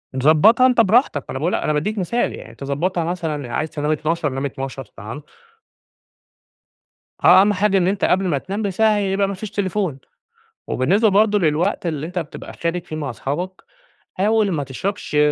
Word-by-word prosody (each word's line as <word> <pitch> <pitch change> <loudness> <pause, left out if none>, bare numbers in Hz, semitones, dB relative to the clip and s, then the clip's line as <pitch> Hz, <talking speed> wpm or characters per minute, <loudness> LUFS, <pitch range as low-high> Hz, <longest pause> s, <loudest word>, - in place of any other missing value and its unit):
ضبّطها 155 - +5
أنت 245 -2 +4
براحتك، 220 - +2
أنا 130 - -4
باقول 165 +5 0
أنا 150 - 0
باديك 210 +9 -1
مثال 220 +6 -1
يعني. 115 - -11
تظبّطها 155 +7 -2
مثلًا 160 -7 -3
عايز 155 - -1
تنام 150 0 -2
00:00 155 0 -1
نام 135 +1 -3
00:00، 135 -1 -5
تمام. 110 +7 -9 2.0
آه، - - +8
أهم 205 +1 +3
حاجة 200 +1 +2
إن 180 -1 +2
أنت 195 0 +1
قبل 190 +1 +2
ما 150 -5 +1
تنام 195 +9 -4
بساعة 210 +2 +2
يبقى 195 0 +1
ما 200 - -3
فيش 200 +2 -7
تليفون، 190 -7 -2 0.7
وبالنسبة 195 - +2
برضو 210 +1 +3
للوقت 170 +2 0
اللي 155 -2 -2
أنت 180 +2 -4
بتبقى 165 -4 -7
خارج 170 +1 -3
فيه 155 - -7
مع 145 -5 -4
صحابك 175 - -4 0.5
حاول 210 +1 +2
ما 150 -4 -1
تشربش 150 +4 -4
175 Hz, 170 wpm, -20 LUFS, 150-200 Hz, 2.0 s, آه